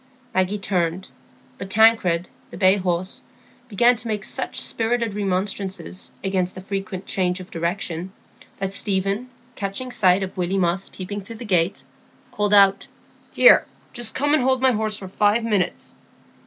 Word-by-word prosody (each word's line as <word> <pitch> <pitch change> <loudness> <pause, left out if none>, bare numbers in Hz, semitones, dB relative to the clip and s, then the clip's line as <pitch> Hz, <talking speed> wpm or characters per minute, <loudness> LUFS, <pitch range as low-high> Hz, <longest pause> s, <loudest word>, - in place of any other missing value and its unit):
Maggie 185 +2 +1
turned. 185 -2 -1 0.5
But 195 - -6
Tancred, 190 -5 +4 0.2
the - - -10
bay 190 0 +5
horse, 185 0 -2 0.5
began 240 +3 +4
to 225 - -6
make 210 -2 -2
such - - -3
spirited 230 -1 -1
remonstrances 195 -1 -3
against 185 -2 -1
this 185 - -9
frequent 195 -1 -5
change 180 -1 0
of 185 - -11
direction, 170 +1 -3 0.5
that 195 0 -3
Stephen, 200 +5 -1 0.2
catching 205 +6 -4
sight 190 -4 +3
of 190 - -6
Willy 185 +1 -1
Moss 185 +1 0
peeping 200 +2 -6
through 225 +4 -10
the 235 +2 -8
gate, 180 -3 +1 0.5
called 205 0 -1
out, 195 -1 +5 0.4
"Here! - - +6 0.3
just 240 -2 -2
come 290 +2 +1
and 305 - +4
hold 260 +1 +2
my 260 0 +4
horse 215 -2 -1
for 190 - -8
five 210 +4 +2
minutes." 210 -6 -1
195 Hz, 155 wpm, -22 LUFS, 185-220 Hz, 0.5 s, Here